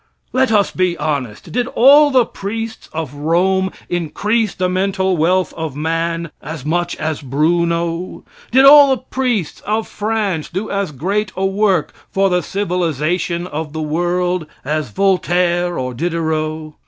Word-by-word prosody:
Let 260 Hz, -1 st, +2 dB
us 205 Hz, -2 st, +3 dB
be 180 Hz, -2 st, 0 dB
honest. 135 Hz, -8 st, -3 dB
Did 245 Hz, 0 st, 0 dB
all 285 Hz, +4 st, +6 dB
the 255 Hz, -4 st, +4 dB
priests 225 Hz, +3 st, -6 dB
of 155 Hz, -4 st, -4 dB
Rome 185 Hz, +6 st, +1 dB, 0.2 s
increase 205 Hz, +6 st, -1 dB
the 185 Hz, -, 0 dB
mental 190 Hz, 0 st, 0 dB
wealth 180 Hz, +3 st, +1 dB
of 160 Hz, -4 st, -5 dB
man 165 Hz, +1 st, -2 dB
as 150 Hz, -1 st, -7 dB
much 175 Hz, +2 st, -1 dB
as 155 Hz, -1 st, -3 dB
Bruno? 170 Hz, +5 st, -1 dB, 0.3 s
Did 265 Hz, +3 st, +5 dB
all 285 Hz, 0 st, +9 dB
the 255 Hz, -, -12 dB
priests 245 Hz, -, -2 dB
of 215 Hz, +1 st, -1 dB
France 205 Hz, -6 st, -2 dB
do 195 Hz, +5 st, -4 dB
as 200 Hz, -4 st, -1 dB
great 190 Hz, +8 st, -2 dB
a 190 Hz, -, 0 dB
work 195 Hz, 0 st, +1 dB, 0.2 s
for 195 Hz, 0 st, +1 dB
the 180 Hz, 0 st, +2 dB
civilization 175 Hz, -2 st, -1 dB
of 155 Hz, -3 st, -5 dB
the 160 Hz, -, -3 dB
world 175 Hz, +2 st, -1 dB, 0.2 s
as 155 Hz, +2 st, -2 dB
Voltaire 180 Hz, -2 st, +1 dB
or 130 Hz, -1 st, -3 dB
Diderot? 155 Hz, 0 st, -2 dB
175 Hz, 145 wpm, -18 LUFS, 160-200 Hz, 0.3 s, all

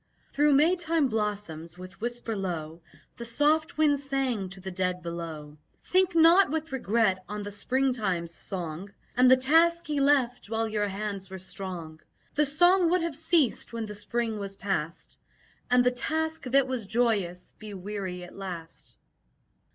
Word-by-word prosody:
Thro' 295 Hz, +1 st, +3 dB
May 305 Hz, +6 st, +5 dB
time 330 Hz, -5 st, +1 dB
blossoms, 205 Hz, -7 st, -3 dB
with 185 Hz, +3 st, -11 dB
whisper 240 Hz, -1 st, -3 dB
low, 170 Hz, -4 st, -4 dB, 0.4 s
The 235 Hz, -, -6 dB
soft 305 Hz, +7 st, +1 dB
wind 295 Hz, -2 st, +3 dB
sang 270 Hz, -8 st, -1 dB
to 190 Hz, +1 st, -11 dB
the 190 Hz, 0 st, -6 dB
dead 180 Hz, -1 st, -2 dB
below: 160 Hz, -3 st, -7 dB, 0.2 s
"Think 370 Hz, -1 st, +2 dB
not 335 Hz, +4 st, +6 dB
with 320 Hz, +1 st, -3 dB
regret 220 Hz, -7 st, +1 dB
on 210 Hz, 0 st, -4 dB
the 205 Hz, -, -6 dB
Springtime's 205 Hz, -6 st, 0 dB
song 175 Hz, +1 st, -5 dB, 0.2 s
And 250 Hz, 0 st, +5 dB
the 260 Hz, -, +7 dB
task 330 Hz, +6 st, +3 dB
ye 295 Hz, -1 st, 0 dB
left 260 Hz, -5 st, +2 dB
while 225 Hz, 0 st, 0 dB
your 210 Hz, -1 st, -1 dB
hands 200 Hz, -1 st, -4 dB
were 190 Hz, -, -7 dB
strong. 180 Hz, -4 st, -6 dB, 0.3 s
The 300 Hz, 0 st, +3 dB
song 350 Hz, +4 st, +5 dB
would 355 Hz, 0 st, +2 dB
have 335 Hz, -4 st, -2 dB
ceased 320 Hz, -7 st, +1 dB
when 230 Hz, -1 st, -3 dB
the 210 Hz, -, -7 dB
Spring 220 Hz, +1 st, -2 dB
was 195 Hz, -1 st, -4 dB
past, 180 Hz, -5 st, -4 dB, 0.5 s
And 250 Hz, 0 st, +5 dB
the 250 Hz, -, +3 dB
task 320 Hz, +5 st, -2 dB
that 270 Hz, +1 st, +3 dB
was 250 Hz, -6 st, -2 dB
joyous 205 Hz, -6 st, 0 dB
be 215 Hz, -2 st, -8 dB
weary 190 Hz, -2 st, -5 dB
at 175 Hz, -, -12 dB
last." 180 Hz, -4 st, -8 dB
220 Hz, 160 wpm, -27 LUFS, 185-280 Hz, 0.5 s, the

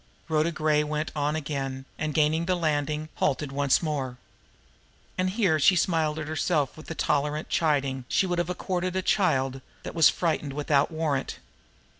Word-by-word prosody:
Rhoda 160 Hz, +1 st, +2 dB
Gray 155 Hz, -2 st, +2 dB
went 150 Hz, +1 st, -3 dB
on 150 Hz, +1 st, 0 dB
again, 135 Hz, -3 st, -4 dB
and 155 Hz, 0 st, -1 dB
gaining 160 Hz, +2 st, +2 dB
the 185 Hz, -, +2 dB
landing, 155 Hz, -2 st, -1 dB
halted 145 Hz, 0 st, 0 dB
once 140 Hz, +2 st, +2 dB
more. 135 Hz, -5 st, -2 dB, 1.0 s
And 185 Hz, 0 st, 0 dB
here 185 Hz, -6 st, +2 dB
she 185 Hz, +6 st, +5 dB
smiled 160 Hz, -3 st, +1 dB
at 155 Hz, -1 st, -4 dB
herself 155 Hz, -2 st, 0 dB
with 155 Hz, -, -12 dB
the 165 Hz, -, -5 dB
tolerant 150 Hz, +1 st, 0 dB
chiding 140 Hz, -5 st, 0 dB
she -, -, +2 dB
would 175 Hz, -1 st, -1 dB
have 175 Hz, -, -1 dB
accorded 180 Hz, 0 st, -2 dB
a 190 Hz, -, 0 dB
child 135 Hz, -10 st, +1 dB, 0.2 s
that -, -, -6 dB
was 165 Hz, -2 st, +6 dB
frightened 155 Hz, -5 st, -1 dB
without 145 Hz, 0 st, +2 dB
warrant. 155 Hz, -4 st, -2 dB
155 Hz, 165 wpm, -27 LUFS, 145-165 Hz, 1.0 s, was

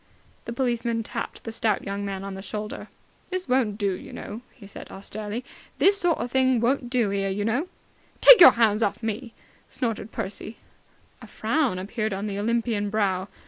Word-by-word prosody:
The -, -, -5 dB
policeman 235 Hz, -2 st, -1 dB
tapped -, -, -6 dB
the 225 Hz, -, -5 dB
stout 220 Hz, -2 st, 0 dB
young 200 Hz, +1 st, -4 dB
man 195 Hz, -1 st, -4 dB
on 195 Hz, 0 st, -5 dB
the 190 Hz, -, -7 dB
shoulder. 210 Hz, +2 st, -6 dB, 0.4 s
"This 370 Hz, 0 st, -3 dB
won't 245 Hz, -5 st, +1 dB
do, 200 Hz, -3 st, 0 dB
you -, -, -9 dB
know!" 215 Hz, +3 st, -7 dB
he 230 Hz, -, -15 dB
said 200 Hz, -, -10 dB
austerely. 210 Hz, +4 st, -6 dB, 0.3 s
"This 400 Hz, +1 st, +5 dB
sort 345 Hz, -3 st, +2 dB
o' -, -, -1 dB
thing 260 Hz, 0 st, +2 dB
won't 245 Hz, +1 st, 0 dB
do, 240 Hz, -5 st, +1 dB
'ere, 195 Hz, 0 st, -1 dB
you 205 Hz, +2 st, -2 dB
know!" 250 Hz, +10 st, 0 dB, 0.5 s
"Take -, -, +9 dB
your 265 Hz, -, +11 dB
hands 220 Hz, -2 st, +3 dB
off 215 Hz, +1 st, -1 dB
me!" 225 Hz, +2 st, -4 dB, 0.3 s
snorted 225 Hz, -3 st, -3 dB
Percy. 215 Hz, +1 st, -5 dB, 0.6 s
A -, -, -11 dB
frown 275 Hz, -12 st, 0 dB
appeared 215 Hz, +2 st, -3 dB
on 195 Hz, +2 st, -4 dB
the 200 Hz, -1 st, -3 dB
Olympian 225 Hz, -1 st, 0 dB
brow. 195 Hz, -3 st, 0 dB
220 Hz, 185 wpm, -25 LUFS, 200-245 Hz, 0.6 s, your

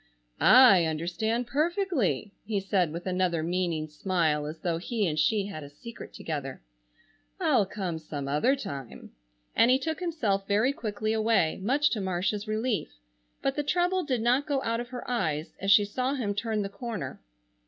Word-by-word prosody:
"I 240 Hz, -10 st, +7 dB
understand 175 Hz, +10 st, -1 dB
perfectly," 290 Hz, -, 0 dB
he 205 Hz, -1 st, -1 dB
said, 190 Hz, -4 st, +1 dB
with 170 Hz, +2 st, -6 dB
another 180 Hz, -3 st, 0 dB
meaning 170 Hz, -2 st, -1 dB
smile 155 Hz, -2 st, 0 dB
as 155 Hz, +2 st, -6 dB
though 170 Hz, -2 st, -1 dB
he 215 Hz, +3 st, -1 dB
and 155 Hz, -3 st, -1 dB
she 200 Hz, +7 st, +2 dB
had 195 Hz, -6 st, -6 dB
a 140 Hz, -, -9 dB
secret 230 Hz, +11 st, -10 dB
together; 140 Hz, -, -5 dB, 0.8 s
"I'll 195 Hz, -, +3 dB
come 185 Hz, -5 st, -4 dB
some 145 Hz, -3 st, -6 dB
other 150 Hz, -, +2 dB
time," 140 Hz, -, -8 dB, 0.4 s
and 230 Hz, -, +5 dB
he 255 Hz, -, +6 dB
took 320 Hz, +5 st, -3 dB
himself 230 Hz, -, -1 dB
very 215 Hz, +7 st, +2 dB
quickly 215 Hz, -2 st, -2 dB
away, 220 Hz, -7 st, +2 dB
much 275 Hz, +8 st, +2 dB
to 215 Hz, -, -1 dB
Marcia's 190 Hz, +3 st, -1 dB
relief. 215 Hz, -, -2 dB, 0.5 s
But 270 Hz, -, +1 dB
the 295 Hz, -, 0 dB
trouble 360 Hz, +5 st, +1 dB
did 255 Hz, -6 st, -1 dB
not 255 Hz, +5 st, +2 dB
go 280 Hz, -2 st, 0 dB
out 230 Hz, 0 st, -1 dB
of 240 Hz, 0 st, -5 dB
her 250 Hz, -1 st, -7 dB
eyes 160 Hz, -11 st, -1 dB
as 195 Hz, -, -1 dB
she 205 Hz, +1 st, +7 dB
saw 255 Hz, +6 st, -1 dB
him 215 Hz, -7 st, -1 dB
turn 215 Hz, 0 st, -1 dB
the 195 Hz, -, -4 dB
corner. 215 Hz, +1 st, -6 dB
205 Hz, 175 wpm, -28 LUFS, 170-245 Hz, 0.8 s, I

